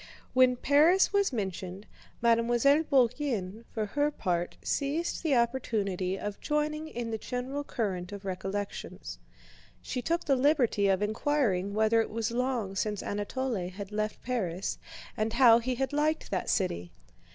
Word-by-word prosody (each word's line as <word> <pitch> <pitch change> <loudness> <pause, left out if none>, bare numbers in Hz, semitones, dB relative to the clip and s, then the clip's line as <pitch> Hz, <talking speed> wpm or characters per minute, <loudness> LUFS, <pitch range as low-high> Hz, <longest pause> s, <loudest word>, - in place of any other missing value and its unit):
When 255 -1 +5
Paris 310 +10 +4
was 400 -3 +3
mentioned, 190 -3 -4 0.4
Mademoiselle 240 +5 +4
Bourienne 245 - 0
for 220 -2 -2
her 290 +7 +1
part 175 -10 -2
seized 300 +4 -1
the 310 -5 +2
opportunity 210 -6 0
of 205 0 -5
joining 305 +1 -1
in 240 -6 -5
the 220 - -2
general 255 +5 -4
current 190 -9 -3
of 200 -1 -8
recollections. 195 +2 -5 0.6
She 250 - -4
took 335 +5 -1
the 275 - +3
liberty 255 -7 +3
of 195 +1 +2
inquiring 210 -4 0
whether 220 +1 +4
it - - -3
was 225 +1 -2
long 240 -5 -1
since 210 0 -2
Anatole 205 -1 -2
had 200 +2 -8
left 215 0 -3
Paris 195 -7 -2 0.4
and 220 +1 -1
how 235 -2 +7
he 250 +2 -2
had 270 +3 -2
liked 305 +2 0
that - - -1
city. 90 - -1
230 Hz, 145 wpm, -29 LUFS, 200-275 Hz, 0.6 s, how